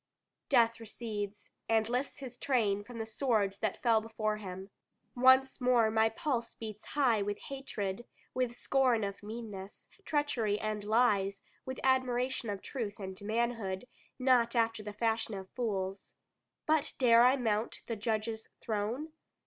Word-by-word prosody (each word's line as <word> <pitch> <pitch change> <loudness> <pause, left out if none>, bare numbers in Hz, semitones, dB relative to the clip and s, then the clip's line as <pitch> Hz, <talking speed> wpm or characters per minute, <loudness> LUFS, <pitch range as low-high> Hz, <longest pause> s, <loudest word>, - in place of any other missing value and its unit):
Death 230 -4 +4
recedes, 210 -2 -6 0.2
and 220 -1 +3
lifts 250 +4 -1
his 260 -3 -7
train 215 -7 +1
from 240 +2 -10
the 225 - -3
swords 220 -4 0
that 215 -3 -2
fell 230 -3 +4
before 215 -1 -2
him. 190 -1 -7 0.4
Once 260 +1 +5
more 240 -3 +4
my 220 0 +4
pulse 235 0 -2
beats 215 -2 -7
high 250 -7 +2
with 205 0 -2
hatred, 240 -6 -5 0.3
with 250 -2 -1
scorn 250 -4 +2
of 200 0 -4
meanness, 210 -2 -8 0.2
treachery, 250 - 0
and 215 -1 -2
lies, 205 -3 +2 0.2
with 260 0 -4
admiration 255 -2 +1
of 200 -1 -4
truth 220 -7 -4
and 190 -1 -7
manhood, 220 -2 -1 0.3
not 250 -2 +3
after 225 -1 +2
the 210 0 -6
fashion 225 0 0
of 190 -1 -8
fools. 195 -5 -3 0.5
But 310 -2 +2
dare 235 -2 +6
I 255 +2 +6
mount 220 -3 -1
the 230 - -3
Judge's 220 0 -2
throne? 225 +8 -2
225 Hz, 145 wpm, -32 LUFS, 205-250 Hz, 0.5 s, dare